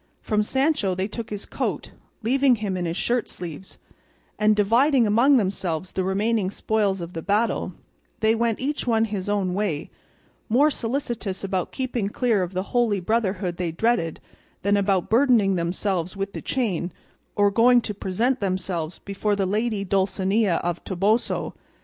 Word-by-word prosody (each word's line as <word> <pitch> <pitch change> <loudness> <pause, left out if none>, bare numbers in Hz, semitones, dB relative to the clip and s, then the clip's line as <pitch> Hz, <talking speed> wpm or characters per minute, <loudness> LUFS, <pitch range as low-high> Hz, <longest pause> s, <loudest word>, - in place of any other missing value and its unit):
From 210 -2 0
Sancho 265 - +1
they 190 +2 -1
took 225 +1 -6
his 205 -1 -5
coat, - - -3 0.3
leaving 265 +2 +4
him 205 -4 -3
in 180 -1 -2
his 165 +1 -2
shirt 240 -1 0
sleeves; 175 +1 -8 0.6
and 215 0 +4
dividing 235 +5 +4
among 240 +7 +5
themselves 185 -5 -2
the 190 - -1
remaining 200 +1 +1
spoils 200 -2 0
of 170 +1 -7
the 165 - -4
battle, 205 0 0 0.5
they 220 0 +3
went 230 -1 0
each 285 0 -2
one 225 -1 +3
his 205 -3 -4
own 195 -3 0
way, 185 -7 -2 0.6
more 280 +7 +4
solicitous 230 -7 -3
about 190 -2 -2
keeping 255 -6 -2
clear 225 -2 +1
of 180 +1 -3
the 185 +1 -1
Holy 235 -5 +2
Brotherhood 190 -3 -1
they 175 -2 -2
dreaded, 170 -3 0 0.4
than 200 +1 +3
about 195 -2 +1
burdening 230 -5 +4
themselves 180 +1 -1
with 195 0 -3
the - - -5
chain, 195 -9 -1 0.4
or 205 -1 +3
going 240 +3 +5
to 210 - -4
present 225 +7 0
themselves 185 -4 -2
before 200 +1 -2
the 195 -1 0
lady 210 +1 0
Dulcinea 195 0 +1
del 175 - +1
Toboso. 205 +5 0
205 Hz, 160 wpm, -24 LUFS, 185-230 Hz, 0.6 s, among